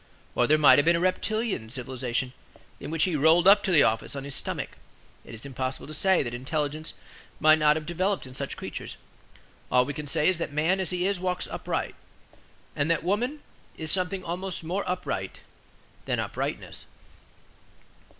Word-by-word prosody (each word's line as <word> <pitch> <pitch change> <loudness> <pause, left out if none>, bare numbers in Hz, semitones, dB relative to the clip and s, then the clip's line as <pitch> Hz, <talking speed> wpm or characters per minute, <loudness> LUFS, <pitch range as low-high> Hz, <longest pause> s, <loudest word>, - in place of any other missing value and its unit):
Or 120 - +2
there 155 - +5
might 150 -1 +7
have 145 - +2
been 170 +1 +5
a - - +1
reptilian 185 - -1
civilization, 125 0 -3 0.5
in - - -7
which 160 0 +1
he 180 -4 +1
rolled 160 +5 +5
up 200 +1 +8
to 195 - -1
the 160 -5 +6
office 110 +5 0
on 140 - -4
his 140 0 -5
stomach; - - -2 0.5
it - - -10
is 110 - -9
impossible 130 -1 -4
to 155 - -8
say 190 +3 +3
that 120 -2 -5
intelligence 150 +4 -3 0.4
might 155 0 +6
not 150 0 +5
have 155 -1 -4
developed 185 +3 -1
in 130 - -11
such 135 +1 -4
creatures. - - -7 0.7
All 125 0 +5
we 145 - -4
can 150 0 -6
say 150 +2 +2
is 185 -2 +2
that 165 - -3
man 160 +6 +1
as 190 - -1
he 180 0 -1
is 195 -1 0
walks 180 0 -1
upright; - - -3 0.8
and 145 - 0
that 165 -1 +1
woman 240 - -1 0.4
is 155 -1 -4
something 185 0 0
almost 180 +1 -4
more 180 +5 -2
upright 140 - -3 0.6
than - - -1
uprightness. - - -4
155 Hz, 180 wpm, -27 LUFS, 140-185 Hz, 0.8 s, up